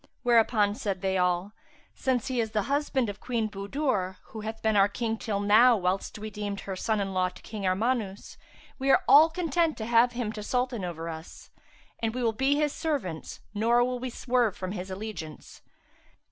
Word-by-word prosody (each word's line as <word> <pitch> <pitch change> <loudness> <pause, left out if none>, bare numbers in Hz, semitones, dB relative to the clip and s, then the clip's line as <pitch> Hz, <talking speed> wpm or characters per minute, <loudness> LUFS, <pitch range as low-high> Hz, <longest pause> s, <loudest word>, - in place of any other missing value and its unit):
Whereupon 225 -4 +4
said 205 -5 -3
they 190 0 +1
all, 180 +2 +1 0.4
"Since 255 -3 0
he 255 -3 0
is 220 -1 -4
the 210 -2 +1
husband 280 -2 0
of 205 0 -6
Queen 230 -3 -1
Budur, 200 -2 -2
who 220 - -7
hath 220 +1 -5
been 220 -1 +2
our 195 0 +6
King 225 +2 -2
till 215 -2 -3
now, 220 +4 +6
whilst 185 +2 -1
we 215 +1 -6
deemed 205 -1 -4
her 195 - -5
son 215 +3 0
in 195 -1 -2
law 185 -1 +1
to 180 - -15
King 210 -3 -4
Armanus, 205 +1 -1 0.4
we 270 +1 0
are - - +5
all 310 +3 +8
content 330 -1 0
to 220 - -4
have 235 +1 +4
him 240 -3 -2
to 215 - -7
Sultan 245 -1 -1
over 165 -2 -5
us; 160 0 -9 0.5
and 225 0 -2
we 255 - -2
will 225 -1 +2
be 265 +5 +2
his 295 -1 +1
servants, 260 - -3
nor 235 +3 +3
will 250 0 -1
we 255 +1 -4
swerve 240 -3 0
from 185 -1 -4
his 185 -1 -5
allegiance." 190 -6 -7
220 Hz, 195 wpm, -28 LUFS, 195-250 Hz, 0.5 s, all